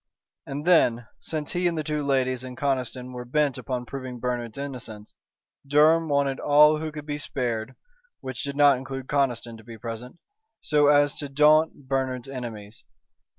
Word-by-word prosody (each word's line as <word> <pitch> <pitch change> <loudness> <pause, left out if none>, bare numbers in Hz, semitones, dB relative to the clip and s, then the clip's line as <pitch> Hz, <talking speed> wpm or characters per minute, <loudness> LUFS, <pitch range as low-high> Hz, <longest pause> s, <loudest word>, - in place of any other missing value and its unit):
And 145 +3 -5
then, 120 -10 +4
since 155 -2 -4
he 180 0 +1
and 170 -1 -1
the 155 - -1
two 150 0 -2
ladies 130 -2 0
and 130 0 -8
Conniston 130 -2 -2
were 125 0 -6
bent 140 +2 0
upon 125 -2 -4
proving 130 -2 -7
Bernard's 120 -2 -3
innocence, 125 -7 -7 0.5
Durham 155 +3 +4
wanted 140 -2 +1
all 150 +1 +5
who 155 0 -4
could 150 -1 -8
be 145 -1 -4
spared 120 -4 -3 0.4
which 130 -2 -6
did 140 0 -4
not 145 -2 +5
include 135 0 -6
Conniston 120 -5 -1
to 110 - -15
be 115 0 -10
present, 115 +4 -7 0.4
so 150 -1 +2
as 145 0 +4
to 145 - -5
daunt 150 0 +3
Bernard's 130 -2 -2
enemies. 115 -6 -8
135 Hz, 165 wpm, -25 LUFS, 125-145 Hz, 0.5 s, all